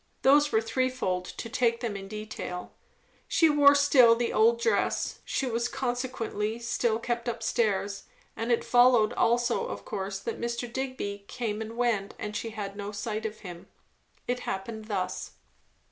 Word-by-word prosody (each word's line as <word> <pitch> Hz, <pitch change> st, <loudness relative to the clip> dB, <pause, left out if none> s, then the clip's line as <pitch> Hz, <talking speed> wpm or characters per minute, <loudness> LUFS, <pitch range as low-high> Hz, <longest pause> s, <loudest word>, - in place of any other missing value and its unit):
Those 290 Hz, +2 st, +5 dB
were 220 Hz, -, +3 dB
threefold, 230 Hz, -7 st, -1 dB
to 230 Hz, -, -7 dB
take 235 Hz, 0 st, +1 dB
them 230 Hz, -4 st, -2 dB
in 195 Hz, 0 st, -6 dB
detail. 210 Hz, -4 st, -6 dB, 0.6 s
She 325 Hz, -2 st, +4 dB
wore 285 Hz, -1 st, +7 dB
still 270 Hz, -5 st, +6 dB
the 235 Hz, 0 st, -1 dB
old 230 Hz, +2 st, +4 dB
dress; -, -, 0 dB
she 270 Hz, -, -1 dB
was 235 Hz, -1 st, 0 dB
consequently 245 Hz, -4 st, -2 dB
still 235 Hz, -1 st, 0 dB
kept 235 Hz, 0 st, -2 dB
up 230 Hz, -1 st, -5 dB
stairs; 205 Hz, -3 st, 0 dB, 0.3 s
and 230 Hz, +2 st, -2 dB
it 235 Hz, -, +2 dB
followed 245 Hz, -2 st, +5 dB
also 240 Hz, +1 st, +1 dB
of -, -, -7 dB
course 195 Hz, -2 st, -4 dB
that 225 Hz, +4 st, -5 dB
Mr. 235 Hz, +1 st, -2 dB
Digby 250 Hz, -7 st, -4 dB
came 220 Hz, -3 st, -3 dB
and 220 Hz, +1 st, -6 dB
went 225 Hz, -5 st, 0 dB
and 210 Hz, 0 st, -5 dB
she 225 Hz, -, -3 dB
had 205 Hz, -3 st, -6 dB
no 205 Hz, 0 st, -5 dB
sight 215 Hz, +1 st, -3 dB
of 215 Hz, 0 st, -10 dB
him. 175 Hz, -4 st, -9 dB, 0.6 s
It 245 Hz, 0 st, -1 dB
happened 220 Hz, +1 st, -5 dB
thus. 185 Hz, -4 st, -3 dB
230 Hz, 160 wpm, -28 LUFS, 210-245 Hz, 0.6 s, wore